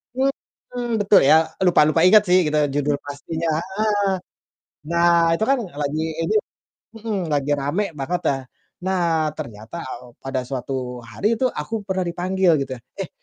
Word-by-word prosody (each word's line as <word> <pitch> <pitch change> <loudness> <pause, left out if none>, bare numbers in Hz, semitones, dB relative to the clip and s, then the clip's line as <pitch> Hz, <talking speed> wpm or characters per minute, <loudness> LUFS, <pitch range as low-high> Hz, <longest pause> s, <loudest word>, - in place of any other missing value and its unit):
mhm, 245 -3 -3
betul 200 0 +6
ya, 160 +3 +5 0.2
lupa-lupa 160 -3 +4
inget 210 +2 +7
sih 180 -2 +5
kita 150 -1 +2
judul 145 0 +1
pastinya 160 +3 -4
heeh, 205 +2 0 0.8
nah 170 -1 +4
itu 220 - -1
kan 275 -2 +3 0.2
lagi 145 +2 -1 0.3
ini 215 - 0 0.6
mhm, 220 -2 -3
lagi 145 0 +1
rame 145 +9 -1
banget 175 +6 -2
ya. 135 - -1 0.5
Nah 170 -4 +1
ternyata, 110 +5 -8
eee, 125 -1 -8
pada 135 -1 -2
suatu 130 -2 -4
hari 210 - 0
itu 260 - +2
aku 215 +7 -4
pernah 190 -1 -1
dipanggil 180 +1 +1
gitu 135 -1 -6
ya, - - -14 0.2
"Eh 190 - -3
170 Hz, 150 wpm, -22 LUFS, 145-195 Hz, 0.8 s, inget